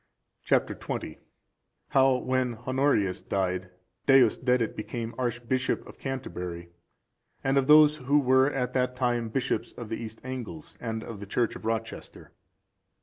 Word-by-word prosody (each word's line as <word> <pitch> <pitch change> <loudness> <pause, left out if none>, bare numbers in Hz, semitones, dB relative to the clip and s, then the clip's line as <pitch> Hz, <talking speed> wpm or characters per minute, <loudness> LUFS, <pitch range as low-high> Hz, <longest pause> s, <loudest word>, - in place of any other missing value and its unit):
Chap. - - +3
XX. - - -5 0.7
How, 135 -1 +4
when 130 -1 0
Honorius 125 -5 +1
died, 95 -1 -1 0.4
Deusdedit 125 -2 +4
became 115 +2 -5
Archbishop 120 +1 -1
of - - -13
Canterbury; 90 -10 -5 0.7
and 135 0 +1
of 135 -1 +2
those 150 0 +7
who 140 +1 +2
were 130 0 +4
at 125 -3 -2
that 125 -1 0
time 120 -3 0
bishops 130 +3 -2
of 120 -3 -8
the 115 - -2
East 110 -1 -7
Angles, 130 +4 -7
and 110 -1 -4
of 110 -3 -8
the 100 - -8
church 120 +3 0
of - - -9
Rochester. 115 0 -4
125 Hz, 140 wpm, -28 LUFS, 110-130 Hz, 0.7 s, those